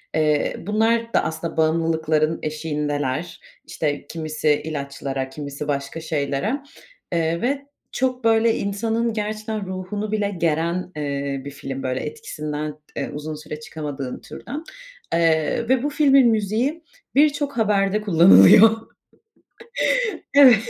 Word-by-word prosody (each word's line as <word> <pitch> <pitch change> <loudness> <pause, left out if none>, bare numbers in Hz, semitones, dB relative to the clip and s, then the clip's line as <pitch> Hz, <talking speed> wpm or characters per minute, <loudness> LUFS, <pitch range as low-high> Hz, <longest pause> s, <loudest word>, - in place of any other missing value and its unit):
Eee, 150 -2 +1
bunlar 225 +4 +1
da - - +3
aslında 160 +1 -4
bağımlılıkların 160 -1 +1
eşiğindeler, 150 0 -2 0.3
işte 145 -2 -3
kimisi 155 -2 0
ilaçlara 140 -3 -4
kimisi 140 +1 -6
başka 140 +2 -3
şeylere, 160 - -1 0.5
eee, 170 0 0
ve 280 +3 -1 0.3
çok 255 -1 -1
böyle 225 0 +4
insanın 225 +3 -1
gerçekten 215 0 -3
ruhunu 190 +3 -4
bile 210 -2 0
geren, 170 +2 0
eee, 140 -2 -3
bir 140 - -6
film 135 -1 -6
böyle 130 0 -1
etkisinden, 150 - -5 0.2
eee, - - -3
uzun 150 +1 -5
süre 150 0 -8
çıkamadığın 145 -4 -6
türden, 300 +3 -8 0.5
eee, 165 +7 +1
ve 260 0 +3
bu 290 - +1
filmin 275 -4 +5
müziği 225 - 0 0.3
birçok 290 -1 +2
haberde 210 -1 +2
kullanılıyor. 170 - +8 1.6
Evet, 270 -4 +9
165 Hz, 115 wpm, -22 LUFS, 150-220 Hz, 1.6 s, Evet